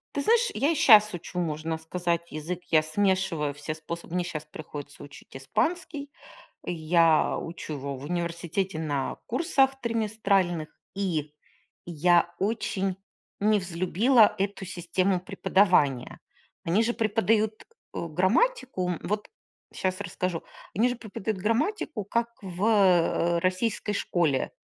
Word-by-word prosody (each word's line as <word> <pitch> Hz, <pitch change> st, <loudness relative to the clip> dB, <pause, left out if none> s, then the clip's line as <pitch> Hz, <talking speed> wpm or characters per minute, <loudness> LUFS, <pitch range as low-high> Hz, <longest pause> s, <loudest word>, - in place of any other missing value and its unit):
Ты 285 Hz, -, 0 dB
знаешь, 465 Hz, +4 st, +3 dB
я 290 Hz, +4 st, +2 dB
и -, -, 0 dB
щас 215 Hz, -, +7 dB
учу, 175 Hz, +1 st, -5 dB
можно 160 Hz, -1 st, -2 dB
сказать, 170 Hz, +1 st, -2 dB
язык. 165 Hz, +4 st, -5 dB
Я 155 Hz, -1 st, +6 dB
смешиваю 170 Hz, -3 st, 0 dB
все 145 Hz, +2 st, -5 dB
способы. 170 Hz, +2 st, -7 dB
Мне 180 Hz, -, +1 dB
щас 155 Hz, -3 st, -5 dB
приходится 150 Hz, -2 st, -9 dB
учить 145 Hz, -1 st, -14 dB
испанский. 290 Hz, -, -2 dB, 0.6 s
Я 165 Hz, -1 st, +3 dB
учу 165 Hz, -2 st, -6 dB
его 140 Hz, -1 st, -5 dB
в 130 Hz, -, -10 dB
университете 170 Hz, +2 st, -2 dB
на 145 Hz, -4 st, -2 dB
курсах 270 Hz, 0 st, +1 dB
триместральных. 205 Hz, -8 st, 0 dB, 0.3 s
И 165 Hz, -7 st, -2 dB, 0.5 s
я 175 Hz, +1 st, +2 dB
очень 195 Hz, -2 st, -1 dB, 0.4 s
невзлюбила 205 Hz, +4 st, +3 dB
эту 195 Hz, 0 st, -2 dB
систему 180 Hz, +1 st, 0 dB
преподавания. 185 Hz, -, +2 dB, 0.5 s
Они 180 Hz, +7 st, +2 dB
же 235 Hz, +1 st, +1 dB
преподают, 220 Hz, -1 st, +1 dB, 0.3 s
э, 170 Hz, -, -3 dB
грамматику, 190 Hz, -, +1 dB
вот 210 Hz, +1 st, -3 dB, 0.4 s
щас 185 Hz, +1 st, -2 dB
расскажу. 185 Hz, -4 st, -3 dB, 0.3 s
Они 235 Hz, +5 st, +4 dB
же 245 Hz, -, -2 dB
преподают 215 Hz, -2 st, -4 dB
грамматику 235 Hz, -, -1 dB
как 235 Hz, +4 st, 0 dB
в, 185 Hz, 0 st, -4 dB
э, 180 Hz, -5 st, +3 dB
российской 185 Hz, +4 st, 0 dB
школе: 165 Hz, -9 st, 0 dB
185 Hz, 120 wpm, -27 LUFS, 165-215 Hz, 0.6 s, щас